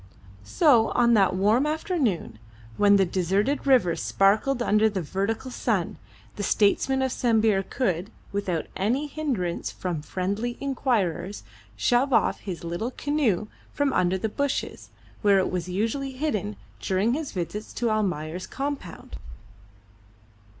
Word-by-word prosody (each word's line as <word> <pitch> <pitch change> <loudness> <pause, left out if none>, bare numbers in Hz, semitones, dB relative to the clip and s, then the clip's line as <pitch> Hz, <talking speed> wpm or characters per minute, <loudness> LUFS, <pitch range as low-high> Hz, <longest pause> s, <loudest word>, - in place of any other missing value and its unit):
So 230 - +4
on 235 -1 +4
that 195 -4 +4
warm 215 +9 +3
afternoon, 300 - -1 0.4
when 205 - +5
the 195 -1 +4
deserted 195 - 0
river 235 -11 +4
sparkled 220 +6 +2
under 215 0 +3
the 195 -4 -3
vertical 200 - -2
sun, - - -1 0.4
the - - -3
statesman 245 +7 +2
of 260 - 0
Sambir 220 -5 +2
could, 190 -3 -2 0.2
without 190 -5 -2
any 240 +10 0
hindrance 265 - -2
from 175 -5 -4
friendly 200 +9 -3
inquirers, 225 - -1 0.3
shove 255 +2 +2
off - - +2
his 180 -4 -6
little 175 +8 -3
canoe 260 - 0 0.3
from 285 -1 0
under 180 +1 +2
the 205 - -2
bushes, 280 +5 -3 0.3
where 205 -2 +5
it 190 - +1
was 180 0 -3
usually 230 +8 -2
hidden 255 - -2 0.2
during 195 - +1
his 300 +1 -3
visits 195 +4 -5
to 235 -2 0
Almayer's 180 -5 -2
compound. 275 -10 -5
215 Hz, 130 wpm, -25 LUFS, 185-260 Hz, 0.4 s, when